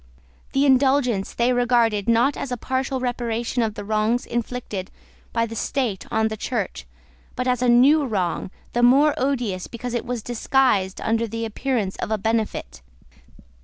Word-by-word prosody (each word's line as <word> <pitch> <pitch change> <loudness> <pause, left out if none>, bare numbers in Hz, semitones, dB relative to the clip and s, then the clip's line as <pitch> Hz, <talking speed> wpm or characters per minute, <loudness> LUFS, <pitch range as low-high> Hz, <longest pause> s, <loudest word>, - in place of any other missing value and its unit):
The 275 +1 +3
Indulgence 265 -6 +3
they 240 +1 +2
regarded, 235 -4 +2
not 235 +5 +3
as 270 - -5
a 245 - -1
partial 260 +2 -2
reparation 240 -1 -2
of 220 -2 -1
the 205 - -6
wrongs 220 +3 +1
inflicted 230 -5 -4 0.4
by 230 0 +1
the 225 0 -7
State 225 -4 -2
on 220 0 +1
the 220 - -4
Church, 200 - -3 0.5
but 250 - -2
as 250 -1 +1
a 250 - +3
new 275 +5 +5
wrong, 190 -5 -1 0.2
the 240 - +1
more 275 +5 +5
odious 245 -9 -1
because 240 +1 -6
it 240 - -1
was 245 -3 -3
disguised 240 -5 +1
under 230 +1 0
the 230 +1 -4
appearance 225 -3 -2
of - - -4
a 220 - +1
benefit. 215 - -2
235 Hz, 165 wpm, -23 LUFS, 220-250 Hz, 0.5 s, new